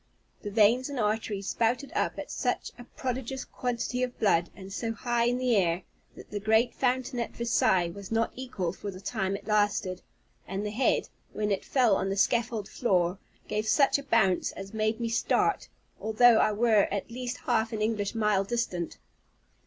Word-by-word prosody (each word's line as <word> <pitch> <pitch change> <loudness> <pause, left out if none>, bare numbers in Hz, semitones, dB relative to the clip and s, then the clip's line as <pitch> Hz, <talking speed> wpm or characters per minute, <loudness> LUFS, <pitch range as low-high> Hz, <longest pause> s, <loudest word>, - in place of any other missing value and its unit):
The 205 - -5
veins 225 +5 +3
and 280 -3 -4
arteries 210 -2 -1
spouted 240 +7 0
up - - 0
such - - -2
a 245 - -9
prodigious 260 +1 -4
quantity 245 0 -3
of 250 -1 -2
blood, 175 -5 +3
and 195 -1 -10
so 225 +2 -2
high 240 0 0
in 245 +1 +1
the 250 -2 +2
air, 175 -2 +1 0.3
that - - -13
the 210 - -3
great 220 +3 +3
fountain 255 0 0
at 235 - -4
Versailles 190 -7 +2
was 200 +2 -10
not 225 0 +1
equal 230 -10 -3
for 205 - -6
the 185 -2 -8
time 195 0 -2
it 200 - -8
lasted; 205 -3 +1 0.5
and 195 +2 -3
the 210 - -2
head, 240 +5 +1 0.2
when 210 -1 -1
it 195 - 0
fell 245 -7 +3
on 190 - -1
the 195 - -2
scaffold 230 -1 +1
floor, 185 -5 +1 0.3
gave 215 +1 -2
such 275 +4 +4
a - - -8
bounce 195 -9 +2
as 195 +2 -9
made 220 +1 0
me 235 - -1
start, 230 - +1 0.3
although 220 +1 +5
I - - +3
were 215 -1 +3
at 200 +3 -3
least 250 +1 -4
half 230 -2 +1
an 215 -2 -2
English 215 -1 -1
mile 210 -3 +2
distant. 195 -6 -2
220 Hz, 185 wpm, -28 LUFS, 200-240 Hz, 0.5 s, although